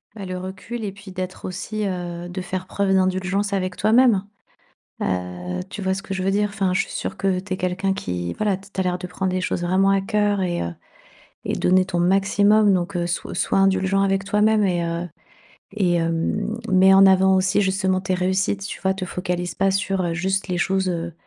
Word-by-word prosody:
Bah, 200 Hz, -, -7 dB
le 185 Hz, 0 st, -4 dB
recul 190 Hz, +6 st, -6 dB
et 205 Hz, -, -3 dB
puis 200 Hz, 0 st, -12 dB
d'être 185 Hz, 0 st, -6 dB
aussi, 210 Hz, +3 st, -4 dB
heu, 175 Hz, -2 st, -4 dB
de 180 Hz, +1 st, -5 dB
faire 185 Hz, 0 st, -5 dB
preuve 200 Hz, -1 st, 0 dB
d'indulgence 190 Hz, +2 st, +1 dB
avec 185 Hz, -2 st, -2 dB
toi-même, 220 Hz, -1 st, +4 dB, 0.8 s
heu, 90 Hz, -1 st, -3 dB
tu -, -, -6 dB
vois 190 Hz, -1 st, 0 dB
ce 195 Hz, -, -5 dB
que 200 Hz, -, -7 dB
je 190 Hz, -1 st, -2 dB
veux 190 Hz, -, +1 dB
dire? 205 Hz, +1 st, +1 dB
Enfin, 195 Hz, -3 st, 0 dB
je -, -, +2 dB
suis -, -, -10 dB
sûre -, -, -4 dB
que 195 Hz, -2 st, 0 dB
tu 190 Hz, 0 st, -4 dB
es -, -, -4 dB
quelqu'un 185 Hz, +1 st, -1 dB
qui, 90 Hz, -, -4 dB
voilà, 205 Hz, -3 st, 0 dB
t 195 Hz, +1 st, -16 dB
tu -, -, -13 dB
as 190 Hz, -, +2 dB
l'air 180 Hz, 0 st, 0 dB
de 180 Hz, -, -6 dB
prendre 185 Hz, +1 st, -2 dB
des 185 Hz, -, 0 dB
choses 185 Hz, -1 st, -2 dB
vraiment 185 Hz, +3 st, +2 dB
à 195 Hz, -1 st, +2 dB
cœur 205 Hz, -1 st, +1 dB
et 175 Hz, -2 st, -1 dB
heu 85 Hz, 0 st, -4 dB, 0.7 s
et -, -, -1 dB
donner 185 Hz, +1 st, +3 dB
ton 180 Hz, -2 st, -2 dB
maximum 200 Hz, +3 st, +4 dB
donc 180 Hz, +1 st, -1 dB
heu, 175 Hz, -1 st, 0 dB
sois 170 Hz, 0 st, -3 dB
sois -, -, 0 dB
indulgent 195 Hz, 0 st, +2 dB
avec 195 Hz, 0 st, +1 dB
toi-même 210 Hz, +2 st, +2 dB
et 175 Hz, -3 st, +1 dB
heu 170 Hz, +1 st, -3 dB, 0.7 s
et 185 Hz, -5 st, +1 dB
hem, 170 Hz, +6 st, -1 dB
mets 190 Hz, +1 st, +6 dB
en 195 Hz, 0 st, +8 dB
avant 190 Hz, 0 st, +5 dB
aussi 190 Hz, +1 st, +2 dB
justement 190 Hz, -1 st, +1 dB
tes 185 Hz, 0 st, -1 dB
réussites, 190 Hz, +2 st, 0 dB
tu -, -, -7 dB
vois? 190 Hz, 0 st, +1 dB
Te 190 Hz, -1 st, -4 dB
focalise 180 Hz, -1 st, -3 dB
pas 195 Hz, 0 st, +2 dB
sur, 195 Hz, 0 st, 0 dB
heu, 170 Hz, -1 st, -1 dB
juste 190 Hz, +3 st, -1 dB
les 180 Hz, -, -1 dB
choses, 190 Hz, +1 st, +1 dB
heu, 170 Hz, -1 st, -3 dB
190 Hz, 220 wpm, -22 LUFS, 180-195 Hz, 0.8 s, en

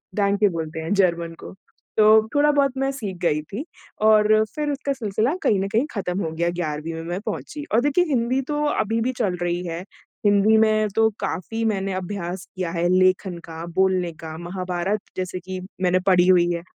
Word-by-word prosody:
डांके 205 Hz, 0 st, +3 dB
बोलते 160 Hz, -2 st, -4 dB
हैं 160 Hz, +4 st, -2 dB
जर्मन 170 Hz, -4 st, +1 dB
को। -, -, -9 dB, 0.4 s
तो 215 Hz, -, +6 dB, 0.3 s
थोड़ा-बहुत 290 Hz, -2 st, +4 dB
मैं 270 Hz, 0 st, 0 dB
सीख 210 Hz, -9 st, -5 dB
गई 150 Hz, -3 st, +2 dB
थी 205 Hz, -, -7 dB, 0.4 s
और 215 Hz, -1 st, +6 dB, 0.3 s
फिर 300 Hz, -1 st, -1 dB
उसका 280 Hz, 0 st, -2 dB
सिलसिला 225 Hz, +1 st, -1 dB
कहीं 205 Hz, -, +3 dB
न 195 Hz, -, -1 dB
कहीं 225 Hz, +6 st, +1 dB
ख़त्म 190 Hz, -3 st, -2 dB
हो 160 Hz, -, -3 dB
गया, 170 Hz, +2 st, 0 dB
11वीं 165 Hz, -2 st, -3 dB
में 165 Hz, 0 st, -6 dB
मैं 175 Hz, +2 st, -3 dB
पहुँची 300 Hz, -1 st, -5 dB
और 230 Hz, -, +5 dB
देखिए, 290 Hz, +6 st, +2 dB
हिंदी 255 Hz, -3 st, +1 dB
तो 295 Hz, 0 st, 0 dB, 0.2 s
अभी 225 Hz, +2 st, 0 dB
भी 250 Hz, +3 st, 0 dB
चल 200 Hz, -6 st, +1 dB
रही 175 Hz, 0 st, -1 dB
है। 165 Hz, 0 st, -4 dB, 0.5 s
हिंदी 205 Hz, +2 st, +5 dB
में 215 Hz, -1 st, +3 dB
तो 220 Hz, 0 st, +4 dB
काफ़ी 210 Hz, +3 st, -3 dB
मैंने 195 Hz, -3 st, -1 dB
अभ्यास 185 Hz, -1 st, -4 dB
किया 180 Hz, -3 st, -3 dB
है 170 Hz, 0 st, 0 dB
लेखन 185 Hz, 0 st, +2 dB
का, 165 Hz, 0 st, -7 dB
बोलने 185 Hz, 0 st, +1 dB
का, 160 Hz, -1 st, -8 dB
महाभारत 180 Hz, +3 st, -3 dB, 0.2 s
जैसे 185 Hz, 0 st, -3 dB
कि 185 Hz, +1 st, -6 dB, 0.2 s
मैंने 185 Hz, 0 st, +3 dB
पढ़ी 180 Hz, -1 st, +5 dB
हुई 175 Hz, -2 st, +5 dB
है। 170 Hz, 0 st, -4 dB
190 Hz, 190 wpm, -23 LUFS, 175-220 Hz, 0.5 s, तो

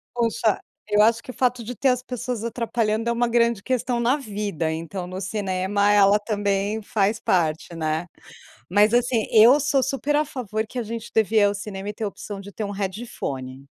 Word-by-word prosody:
Poxa, 230 Hz, -3 st, +1 dB, 0.3 s
eu 210 Hz, 0 st, +4 dB
acho 225 Hz, +2 st, +3 dB
que -, -, -7 dB
o -, -, -14 dB
fato 250 Hz, -2 st, 0 dB
de 245 Hz, +3 st, -6 dB
ter 270 Hz, -, 0 dB
as 250 Hz, 0 st, 0 dB
pessoas 250 Hz, -2 st, -4 dB
atrapalhando 230 Hz, -1 st, -1 dB
é -, -, +2 dB
uma 240 Hz, +1 st, +1 dB
grande 235 Hz, -3 st, +2 dB
questão 250 Hz, -1 st, -1 dB
na 240 Hz, +3 st, +3 dB
vida. 205 Hz, -, -3 dB
Então, 165 Hz, +3 st, -5 dB
no 185 Hz, +1 st, -6 dB
cinema, 195 Hz, 0 st, 0 dB
ela 205 Hz, 0 st, +5 dB
também 205 Hz, 0 st, -1 dB
faz 210 Hz, +1 st, 0 dB
parte, 165 Hz, -1 st, 0 dB
né. 160 Hz, +1 st, -2 dB, 0.6 s
Mas 205 Hz, +4 st, +4 dB
assim 240 Hz, -2 st, +2 dB
eu 235 Hz, +6 st, +7 dB
sou 280 Hz, -1 st, +2 dB
super 275 Hz, +2 st, 0 dB
a 300 Hz, -, +3 dB
favor 220 Hz, -7 st, -4 dB
que 250 Hz, -, -7 dB
a -, -, 0 dB
gente 230 Hz, +1 st, -6 dB
devia 220 Hz, 0 st, +3 dB
ir -, -, +6 dB
ao 200 Hz, 0 st, +2 dB
cinema 200 Hz, -1 st, -6 dB
e -, -, -4 dB
ter 220 Hz, -, -4 dB
a -, -, 0 dB
opção 200 Hz, 0 st, -8 dB
de 200 Hz, +1 st, -10 dB
ter 215 Hz, -, -4 dB
um 200 Hz, -, -4 dB
headphone. 185 Hz, -, -5 dB
215 Hz, 205 wpm, -23 LUFS, 195-235 Hz, 0.6 s, eu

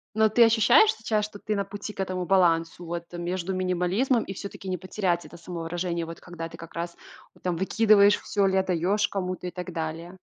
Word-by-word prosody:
Но 220 Hz, 0 st, +5 dB
ты 235 Hz, +3 st, +5 dB
ощущаешь 230 Hz, -, +6 dB
сейчас, 215 Hz, -, -1 dB
что 210 Hz, -1 st, -10 dB
ты 210 Hz, +1 st, -3 dB
на 200 Hz, -, 0 dB
пути 205 Hz, +2 st, -7 dB
к -, -, -18 dB
этому 185 Hz, -1 st, -2 dB
балансу, 175 Hz, -2 st, +2 dB
вот 170 Hz, 0 st, -4 dB
между 175 Hz, +2 st, -3 dB
минимализмом 185 Hz, +7 st, +1 dB
и, 195 Hz, -, -6 dB
всё-таки, 195 Hz, 0 st, -8 dB
не 185 Hz, -1 st, -1 dB
потерять 180 Hz, -1 st, -1 dB
это 170 Hz, -, -12 dB
самовыражение, 170 Hz, 0 st, -3 dB
вот 165 Hz, 0 st, -9 dB
когда 165 Hz, -2 st, -7 dB
ты, 165 Hz, -, -11 dB
как 165 Hz, 0 st, -11 dB
раз, 170 Hz, +1 st, -4 dB, 0.4 s
ну, -, -, -22 dB
там, 180 Hz, -2 st, 0 dB
выкидываешь 205 Hz, +2 st, +5 dB
всё 200 Hz, -2 st, +1 dB
или 190 Hz, -, +1 dB
отдаёшь 190 Hz, +2 st, +1 dB
кому-то 185 Hz, -2 st, -4 dB
и -, -, -4 dB
так 180 Hz, 0 st, -6 dB
далее. 165 Hz, +2 st, -5 dB
185 Hz, 205 wpm, -26 LUFS, 170-205 Hz, 0.4 s, ощущаешь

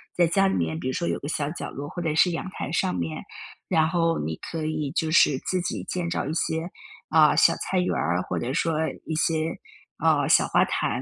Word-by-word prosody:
在 175 Hz, -1 st, +4 dB
家 195 Hz, +4 st, +3 dB
里 -, -, 0 dB
面， 80 Hz, -2 st, -1 dB
比 -, -, -4 dB
如 130 Hz, -, -1 dB
说 170 Hz, -, -2 dB
有 -, -, -1 dB
个 145 Hz, -, -6 dB
小 145 Hz, -2 st, -1 dB
角 -, -, -6 dB
落 145 Hz, +2 st, -6 dB
或 175 Hz, -, -6 dB
者 160 Hz, -3 st, -1 dB
是 180 Hz, +2 st, +4 dB
阳 165 Hz, -, -4 dB
台 -, -, -5 dB
上 90 Hz, -, 0 dB
面， 80 Hz, -3 st, -3 dB, 0.4 s
然 160 Hz, -3 st, +3 dB
后 165 Hz, -1 st, +1 dB
你 80 Hz, +2 st, -3 dB
可 165 Hz, -1 st, -4 dB
以 155 Hz, -3 st, -2 dB
就 160 Hz, 0 st, -1 dB
是 150 Hz, -4 st, +5 dB
自 185 Hz, -, -1 dB
己 175 Hz, -, -3 dB
建造 170 Hz, -2 st, -2 dB
一 150 Hz, -, -3 dB
些， 160 Hz, +1 st, -1 dB, 0.4 s
啊， 155 Hz, -1 st, +5 dB
小 -, -, +5 dB
菜 185 Hz, -, -1 dB
园 180 Hz, -, 0 dB
儿， 90 Hz, +4 st, 0 dB
或 -, -, -4 dB
者 125 Hz, +3 st, -3 dB
说 165 Hz, 0 st, 0 dB, 0.3 s
一 160 Hz, -, -3 dB
些， 160 Hz, 0 st, 0 dB, 0.4 s
啊， -, -, +2 dB
小 -, -, +5 dB
花 -, -, +3 dB
坛。 -, -, -1 dB
160 Hz, 250 characters per minute, -25 LUFS, 140-170 Hz, 0.4 s, 是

